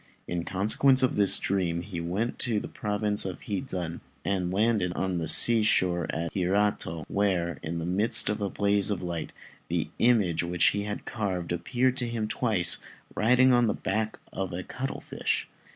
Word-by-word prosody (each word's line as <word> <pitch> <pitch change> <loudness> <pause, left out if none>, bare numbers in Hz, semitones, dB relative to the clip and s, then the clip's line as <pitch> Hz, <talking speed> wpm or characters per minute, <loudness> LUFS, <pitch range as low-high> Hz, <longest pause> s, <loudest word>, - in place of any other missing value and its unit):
In 85 -1 -4
consequence 110 +8 +3
of 130 - +1
this 100 -2 +7
dream 85 -3 -2
he 90 -4 -6
went 95 +8 -3
to 115 -4 0
the - - -7
province 105 0 +2
of 95 -2 -5
Hizen, 95 -7 -5 0.3
and 90 -3 -1
landed 105 -2 0
on 95 -1 -2
the 80 - -3
sea 115 -1 +8
shore 90 -5 +1
at 85 0 -4
Hirato, 95 -4 -1
where, 90 -6 -1
in 85 +1 -5
the 80 - -4
midst 100 +6 +3
of 105 0 -2
a 100 - -1
blaze 100 0 0
of 95 -3 -3
light, 85 -2 -5 0.4
the - - -2
image 105 -9 +2
which 85 0 +2
he 100 0 -3
had 105 0 -6
carved 95 -6 -4
appeared 125 +8 -1
to 125 -2 -2
him 115 -2 -3
twice, 105 -8 0 0.4
riding 125 +4 +4
on 120 -1 +3
the 105 - -1
back 110 +2 -3 0.2
of 95 -1 -4
a 90 +1 -5
cuttlefish. 135 +7 -4
100 Hz, 175 wpm, -27 LUFS, 90-110 Hz, 0.4 s, sea